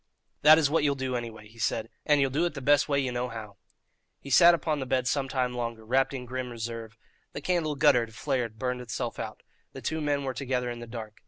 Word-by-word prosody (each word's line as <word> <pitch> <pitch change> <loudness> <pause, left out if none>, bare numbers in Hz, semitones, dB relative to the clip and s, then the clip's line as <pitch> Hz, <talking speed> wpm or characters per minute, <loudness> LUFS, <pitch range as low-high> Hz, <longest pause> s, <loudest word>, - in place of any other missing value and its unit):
"That 155 +1 +8
is 160 -3 +3
what 150 +1 +1
you'll 140 -1 +2
do, 130 -1 -2
any 120 -1 -3
way," 110 -1 -13
he 115 +2 -18
said; 110 +1 0 0.2
"and 150 -1 +5
ye'll 135 -1 +2
do 150 +6 +1
it 170 - -2
the - - -4
best 145 +2 +3
way 140 -1 +2
ye 130 -2 -1
know 125 +1 -2
how." 110 -3 -8 0.6
He 140 - -9
sat 170 +5 +8
upon 155 -3 -1
the 130 - -4
bed 130 -1 +1
some 135 0 0
time 125 -2 0
longer, 115 -2 -4
wrapped 130 +4 +2
in 130 -2 -5
grim 130 0 -4
reserve. 115 -1 -6 0.4
The - - -4
candle 160 -2 0
guttered, 115 -4 +3
flared, 125 -5 -2
burned 125 +1 -2
itself 120 0 -4
out. - - -6 0.3
The - - -8
two 160 +1 -2
men 145 -1 0
were 130 -1 -2
together 125 -2 -2
in 120 - -6
the 120 - -8
dark. 110 -2 -8
125 Hz, 245 wpm, -28 LUFS, 115-140 Hz, 0.6 s, That